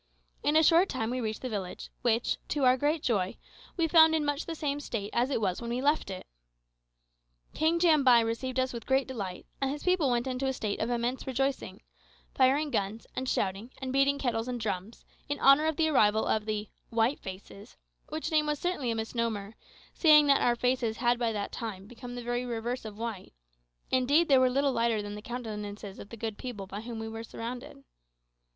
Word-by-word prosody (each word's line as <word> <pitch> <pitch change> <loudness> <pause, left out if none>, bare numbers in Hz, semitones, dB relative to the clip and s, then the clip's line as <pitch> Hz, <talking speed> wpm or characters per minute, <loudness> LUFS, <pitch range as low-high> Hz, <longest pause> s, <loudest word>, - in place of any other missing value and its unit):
In 295 - +1
a 315 - +6
short 340 +4 +5
time 230 -3 -2
we 255 0 -2
reached 220 +1 -4
the - - -1
village, 190 -5 -5
which, 235 0 +1
to 290 - -1
our 255 0 +6
great 295 +4 0
joy, 195 -6 0 0.4
we 335 -2 +2
found 320 -1 +7
in 305 -2 0
much 290 +1 -2
the 330 - -4
same 290 -2 -2
state 215 -7 -4
as 245 +3 +2
it 275 - 0
was 190 -2 -1
when 235 - -5
we 240 +1 -1
left 290 -3 +1
it. 185 -1 -6 1.3
King 320 +2 +2
Jambai 280 -8 +6
received 255 +3 -2
us 260 0 0
with 235 -2 -7
great 265 0 +2
delight, 200 -8 -5 0.2
and 270 - +1
his 290 +2 -4
people 360 -6 +2
went 240 0 +1
into 260 +1 -2
a 265 - 0
state 215 -5 -3
of 220 - -1
immense 245 +2 -2
rejoicing 270 - -2 0.5
firing 280 +3 +3
guns, 205 +1 -2
and 260 0 -2
shouting, 195 +4 -1
and 260 -1 -4
beating 275 +1 +3
kettles 235 -4 -1
and 250 -1 -3
drums, 205 0 -4 0.2
in 290 - -2
honour 275 +3 +6
of 315 - 0
the 320 +1 +2
arrival 220 -6 +3
of 215 0 0
the 215 -1 -2 0.2
"white 230 +4 +1
faces;" 195 +1 -10 0.3
which 310 +1 -4
name 305 -1 +3
was 300 0 0
certainly 350 -7 -2
a 230 - 0
misnomer, 225 -2 -2 0.4
seeing 305 -3 +6
that 280 -1 +4
our 240 - +3
faces 245 -2 0
had 240 0 +2
by 235 -2 +1
that 205 -2 -3
time 205 -5 -6
become 245 +2 -9
the 245 - -6
very 240 +1 -1
reverse 240 0 -3
of 210 -1 -8
white 225 - -5 0.6
indeed 285 +6 +3
they 270 -2 +6
were 255 0 +4
little 275 +2 +2
lighter 230 -3 +1
than 205 0 -6
the 210 - -7
countenances 210 -4 -6
of 200 - -10
the 230 - -9
good 220 -1 -4
people 230 -6 -6
by 200 +2 -7
whom 230 0 -7
we 225 0 -5
were 225 0 -6
surrounded. 230 - -7
245 Hz, 210 wpm, -29 LUFS, 220-275 Hz, 1.3 s, found